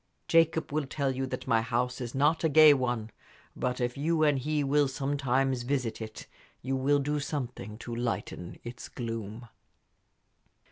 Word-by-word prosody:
Jacob 165 Hz, -1 st, +3 dB
will 150 Hz, -2 st, 0 dB
tell 140 Hz, 0 st, -1 dB
you 135 Hz, 0 st, -2 dB
that -, -, -5 dB
my 115 Hz, -3 st, +3 dB
house 125 Hz, +3 st, -1 dB
is 120 Hz, 0 st, -5 dB
not 150 Hz, +5 st, +2 dB
a 160 Hz, -, +3 dB
gay 155 Hz, 0 st, +8 dB
one; 120 Hz, -5 st, -1 dB, 0.4 s
but 125 Hz, 0 st, -2 dB
if 120 Hz, 0 st, -1 dB
you 155 Hz, +3 st, +1 dB
and 145 Hz, -3 st, +3 dB
he 150 Hz, +2 st, 0 dB
will 145 Hz, +1 st, +3 dB
sometimes 135 Hz, -1 st, 0 dB
visit 120 Hz, -3 st, -2 dB
it, 110 Hz, 0 st, -7 dB, 0.4 s
you 135 Hz, +2 st, -1 dB
will 140 Hz, +2 st, +3 dB
do 145 Hz, +1 st, -1 dB
something 125 Hz, -8 st, -5 dB
to 120 Hz, 0 st, -6 dB
lighten 115 Hz, -7 st, -4 dB
its 120 Hz, +1 st, -8 dB
gloom." 115 Hz, -1 st, -5 dB
130 Hz, 160 wpm, -29 LUFS, 120-145 Hz, 0.4 s, gay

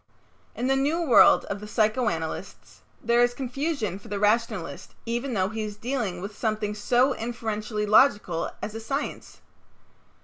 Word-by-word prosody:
In 245 Hz, -, -3 dB
the 270 Hz, +1 st, +2 dB
new 290 Hz, +5 st, +1 dB
world 275 Hz, -7 st, +6 dB
of 200 Hz, -, -4 dB
the 210 Hz, -, -9 dB
psychoanalysts 215 Hz, -7 st, -2 dB, 0.2 s
there 235 Hz, +1 st, +3 dB
is 245 Hz, 0 st, +2 dB
confusion 255 Hz, -, -3 dB
for -, -, -15 dB
the 205 Hz, -, -3 dB
rationalist 210 Hz, -7 st, -1 dB
even 240 Hz, +2 st, -2 dB
though 190 Hz, -1 st, +1 dB
he 220 Hz, 0 st, -4 dB
is 210 Hz, -1 st, -5 dB
dealing 220 Hz, -7 st, -3 dB
with 200 Hz, +2 st, -7 dB
something 215 Hz, -2 st, -1 dB
so 245 Hz, +6 st, +2 dB
inferentially 220 Hz, -2 st, -3 dB
logical 205 Hz, -6 st, +3 dB
as 210 Hz, -, -4 dB
a 225 Hz, -, -5 dB
science. 270 Hz, +6 st, -5 dB
220 Hz, 150 wpm, -26 LUFS, 210-245 Hz, 0.2 s, world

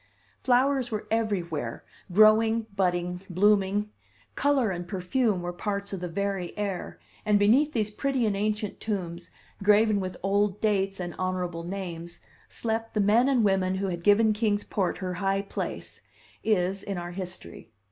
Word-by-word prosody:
Flowers 260 Hz, 0 st, +2 dB
were 215 Hz, -1 st, -3 dB
everywhere, 175 Hz, -, -1 dB, 0.3 s
growing, 220 Hz, +3 st, +5 dB
budding, 180 Hz, -2 st, 0 dB
blooming; 205 Hz, +2 st, +2 dB, 0.4 s
color 275 Hz, -7 st, +2 dB
and 175 Hz, -1 st, -5 dB
perfume 190 Hz, +1 st, 0 dB
were 175 Hz, 0 st, -3 dB
parts 200 Hz, +2 st, -3 dB
of 195 Hz, -, -3 dB
the 180 Hz, -, -4 dB
very 195 Hz, 0 st, -3 dB
air, 200 Hz, -3 st, -3 dB, 0.3 s
and 210 Hz, -1 st, +3 dB
beneath 255 Hz, +10 st, +4 dB
these 215 Hz, -3 st, 0 dB
pretty 265 Hz, +2 st, 0 dB
and 210 Hz, -2 st, +1 dB
ancient 210 Hz, 0 st, -2 dB
tombs, 175 Hz, -5 st, -4 dB, 0.3 s
graven 210 Hz, +1 st, +4 dB
with 185 Hz, -1 st, -4 dB
old 200 Hz, +1 st, +1 dB
dates 195 Hz, -2 st, 0 dB
and 175 Hz, -2 st, -4 dB
honorable 180 Hz, -2 st, -2 dB
names, 175 Hz, -2 st, -6 dB, 0.3 s
slept 225 Hz, 0 st, -3 dB
the -, -, +2 dB
men 220 Hz, +6 st, +4 dB
and 255 Hz, -4 st, +3 dB
women 190 Hz, -1 st, +2 dB
who 195 Hz, 0 st, -1 dB
had 170 Hz, -1 st, -4 dB
given 215 Hz, +2 st, +5 dB
Kings 210 Hz, -1 st, 0 dB
Port 190 Hz, -4 st, -1 dB
her 185 Hz, -1 st, -3 dB
high 195 Hz, +2 st, 0 dB
place 195 Hz, -, -5 dB, 0.4 s
is; 195 Hz, -2 st, +1 dB
in 200 Hz, -2 st, -4 dB
our 175 Hz, 0 st, -5 dB
history. 180 Hz, -9 st, -7 dB
200 Hz, 155 wpm, -27 LUFS, 180-215 Hz, 0.4 s, growing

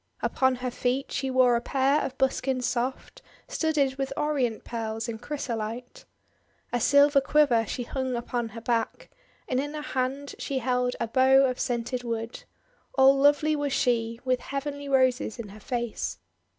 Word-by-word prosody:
Upon 260 Hz, -1 st, +2 dB
her 250 Hz, 0 st, -4 dB
feet 255 Hz, +3 st, -1 dB
she 265 Hz, 0 st, -2 dB
wore 255 Hz, -2 st, +4 dB
a 235 Hz, -, 0 dB
pair 275 Hz, +3 st, +2 dB
of 265 Hz, -, -4 dB
buskins 260 Hz, -1 st, 0 dB
soft, 250 Hz, +2 st, -3 dB, 0.3 s
studded 305 Hz, -, 0 dB
with 270 Hz, 0 st, -2 dB
Orient 270 Hz, -7 st, 0 dB
Pearls 225 Hz, 0 st, -4 dB
and 225 Hz, -1 st, -5 dB
Chrysolite. 245 Hz, -, -5 dB, 0.7 s
A 245 Hz, -, +2 dB
silver 285 Hz, +3 st, +5 dB
quiver 270 Hz, -6 st, +3 dB
she 245 Hz, -, -3 dB
hung 260 Hz, +1 st, -3 dB
upon 235 Hz, 0 st, -3 dB
her -, -, -6 dB
back, 230 Hz, -1 st, -2 dB, 0.4 s
and 255 Hz, -, 0 dB
in 290 Hz, +2 st, -3 dB
her 300 Hz, -, -5 dB
hand 270 Hz, 0 st, -2 dB
she 275 Hz, -, -3 dB
held 250 Hz, 0 st, 0 dB
a 230 Hz, -, -1 dB
bow 265 Hz, +3 st, +5 dB
of 255 Hz, -1 st, -1 dB
scented 245 Hz, 0 st, -2 dB
wood. 230 Hz, -1 st, -4 dB, 0.5 s
All 270 Hz, 0 st, +6 dB
lovely 290 Hz, +2 st, +3 dB
was 290 Hz, -2 st, -1 dB
she, 230 Hz, -3 st, 0 dB
with 255 Hz, -1 st, +1 dB
heavenly 280 Hz, +2 st, -5 dB
Roses 255 Hz, -4 st, +2 dB
in 230 Hz, -4 st, -7 dB
her 210 Hz, +2 st, -12 dB
face. 240 Hz, +1 st, -3 dB
255 Hz, 165 wpm, -27 LUFS, 240-275 Hz, 0.7 s, All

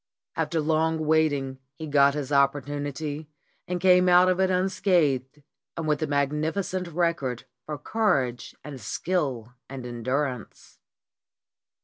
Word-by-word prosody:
After 165 Hz, -, -1 dB
long 160 Hz, +1 st, +1 dB
waiting 145 Hz, -4 st, +1 dB, 0.2 s
he 160 Hz, -, -7 dB
got 140 Hz, -1 st, +4 dB
his 145 Hz, -2 st, -4 dB
opportunity 145 Hz, +2 st, -1 dB, 0.4 s
and 180 Hz, 0 st, -2 dB
came 180 Hz, 0 st, +5 dB
out 180 Hz, +1 st, +6 dB
of 185 Hz, 0 st, +1 dB
it 190 Hz, 0 st, +3 dB
unscathed, 175 Hz, -8 st, +1 dB, 0.3 s
and 165 Hz, -1 st, -3 dB
with 150 Hz, -1 st, +1 dB
a 155 Hz, -, 0 dB
magnificent 155 Hz, +6 st, -1 dB
record 170 Hz, -7 st, -1 dB, 0.2 s
for 150 Hz, -1 st, -4 dB
courage 140 Hz, -, -1 dB
and 135 Hz, -3 st, -8 dB
skill 130 Hz, -8 st, -2 dB, 0.2 s
and 130 Hz, -2 st, -7 dB
endurance. 125 Hz, 0 st, -4 dB
150 Hz, 120 wpm, -26 LUFS, 140-175 Hz, 0.4 s, out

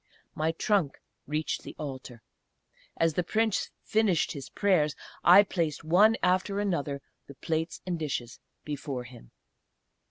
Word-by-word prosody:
My 155 Hz, +1 st, 0 dB
trunk 175 Hz, -4 st, 0 dB, 0.3 s
reached 150 Hz, +2 st, -2 dB
the -, -, -10 dB
Altar. 130 Hz, -5 st, -7 dB, 0.7 s
As 165 Hz, -1 st, +2 dB
the 180 Hz, -, +1 dB
Prince 220 Hz, +4 st, 0 dB
finished 215 Hz, -6 st, +2 dB
his 140 Hz, -3 st, -7 dB
prayers 165 Hz, -7 st, +2 dB, 0.3 s
I 185 Hz, +4 st, +9 dB
placed, 165 Hz, -7 st, -2 dB
one 195 Hz, +8 st, +5 dB
after 185 Hz, +2 st, +2 dB
another, 145 Hz, -8 st, -2 dB, 0.2 s
the 140 Hz, -, -11 dB
plates 160 Hz, +4 st, -3 dB
and 175 Hz, -2 st, -2 dB
dishes 130 Hz, -6 st, -4 dB, 0.3 s
before 140 Hz, -3 st, -4 dB
him. 120 Hz, -, -14 dB
160 Hz, 130 wpm, -29 LUFS, 140-185 Hz, 0.7 s, I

